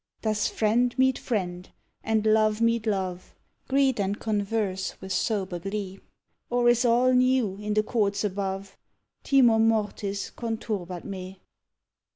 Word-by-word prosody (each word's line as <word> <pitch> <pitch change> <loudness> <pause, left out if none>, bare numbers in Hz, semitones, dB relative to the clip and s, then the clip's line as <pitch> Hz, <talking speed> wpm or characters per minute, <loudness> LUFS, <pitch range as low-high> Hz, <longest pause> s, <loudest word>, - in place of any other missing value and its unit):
_ - - -42
Does 215 -1 +1
friend 240 +3 +1
meet 260 0 +3
friend 180 -6 -3 0.3
and 220 -1 0
love 215 0 +3
meet 230 -1 +1
love, 185 -3 -3 0.3
Greet 270 -3 +2
and 200 +1 -1
converse 205 -3 -2
with 190 0 -5
sober 190 -6 -1
glee, 195 +1 -5 0.5
Or 245 0 +2
is 240 +1 +3
all 245 +2 +4
new 250 -6 +2
in 210 0 -3
the 215 - +3
courts 205 -3 0
above? 195 -1 -4 0.4
_Timor 240 -5 +4
mortis 210 -2 0
conturbat 210 -6 -4
me. 190 -1 -8
215 Hz, 135 wpm, -26 LUFS, 195-230 Hz, 0.5 s, all